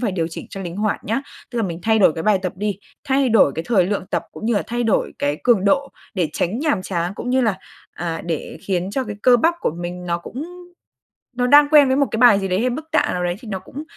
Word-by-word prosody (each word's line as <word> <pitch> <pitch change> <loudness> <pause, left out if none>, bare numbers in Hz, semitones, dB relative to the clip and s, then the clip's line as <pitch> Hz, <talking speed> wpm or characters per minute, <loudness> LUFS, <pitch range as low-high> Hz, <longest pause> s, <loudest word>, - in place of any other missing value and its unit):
phải 225 -6 -1
điều 165 -3 -1
chỉnh 165 - -8
cho 195 - -7
linh 175 -1 -6
hoạt 210 0 -1
nhá. 230 +6 -1 0.3
Tức 240 - -7
là 230 - +1
mình 170 -4 -3
thay 220 0 +3
đổi 185 -6 +5
cái 160 - -5
bài 210 -2 +3
tập 185 - -2
đi, 205 0 -2 0.3
thay 270 -1 +2
đổi 220 - +4
cái 160 - -4
thời 190 -7 +3
lượng 200 -2 -2
tập, - - 0
cũng - - -9
như 235 - +2
là 200 - +1
thay 240 0 -2
đổi 220 - +1
cái 145 +1 0
cường 230 -6 +4
độ 275 +7 +2 0.3
để 180 -5 0
tránh 190 +7 -1
nhàm 285 -10 0
chán, 175 -1 -2
cũng 245 - -4
như 260 +1 +3
là, 220 -6 +1 0.3
à, 165 -2 -4
để 165 -3 -4
khiến 185 -1 -2
cho 265 +5 -1
cái 210 -3 -6
cơ 250 -1 +6
bắp 330 +8 +2
của - - 0
mình 175 +2 -6
nó 170 -1 -1
cũng 250 - -7 0.9
nó 245 0 +1
đang 290 +2 +7
quen 295 -3 +7
với 260 +1 +2
một 280 - +3
cái - - -1
bài 230 -4 +6
gì 195 - -2
đấy 185 +2 0
hay 250 - +1
mức 295 +6 -5
tạ 315 - +2
nào 180 0 -2
đấy 175 0 -1
thì 230 - -12
nó 190 -3 -3
cũng 275 +10 -9
210 Hz, 280 wpm, -21 LUFS, 180-250 Hz, 0.9 s, đang